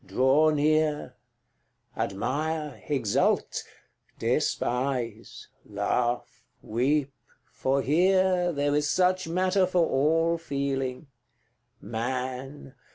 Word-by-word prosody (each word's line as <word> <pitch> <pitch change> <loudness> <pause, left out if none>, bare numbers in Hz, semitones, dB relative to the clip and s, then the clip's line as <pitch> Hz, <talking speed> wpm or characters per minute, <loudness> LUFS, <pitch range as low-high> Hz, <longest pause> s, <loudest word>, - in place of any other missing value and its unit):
draw 135 +5 +3
near, 150 -2 +1 0.8
CIX. 115 - -1
Admire, 150 +7 -3
exult 130 -9 0 0.5
despise 125 -3 -2 0.2
laugh, 120 0 -2 0.2
weep 135 +5 0 0.4
for 135 +1 0
here 180 +3 +3
There 145 -2 0
is 150 0 +1
such 185 0 +2
matter 185 +2 +2
for 180 -2 +2
all 165 +4 +2
feeling: 140 -3 -3 0.7
Man! 130 +5 -5
145 Hz, 85 wpm, -27 LUFS, 130-165 Hz, 0.8 s, draw